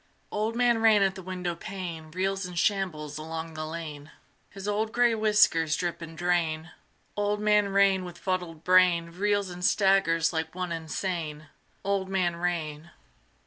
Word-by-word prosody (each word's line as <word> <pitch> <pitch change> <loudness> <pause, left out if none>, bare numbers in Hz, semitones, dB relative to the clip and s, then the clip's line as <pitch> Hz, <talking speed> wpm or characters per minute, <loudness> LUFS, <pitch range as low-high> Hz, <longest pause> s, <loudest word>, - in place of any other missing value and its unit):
Old 215 +2 -1
Man 240 -1 +3
Rain 220 -3 +5
at 195 -1 +2
the 190 - -9
windowpane 180 -2 -5
Reels 190 +3 -1
and 180 -1 -9
shambles 160 -7 -1
along 160 +1 -6
the 155 0 -5
lane: 155 -3 -7 0.4
His 195 0 -8
old 215 +1 0
gray 240 -1 +4
whiskers 210 -8 +3
drip 175 -1 -3
and 165 -1 -9
drain: 170 -2 0 0.4
Old 205 0 0
Man 210 -1 +3
Rain 195 -1 +3
with 175 -1 -8
fuddled 180 -4 -3
brain 180 -2 +4
Reels 200 +1 0
and 175 0 -8
staggers 190 -5 +3
like 160 0 -3
one 180 -1 -3
insane. 160 -2 -4 0.3
Old 195 -1 -1
Man 180 -3 +1
Rain. 170 -2 -3
180 Hz, 150 wpm, -27 LUFS, 165-200 Hz, 0.4 s, Rain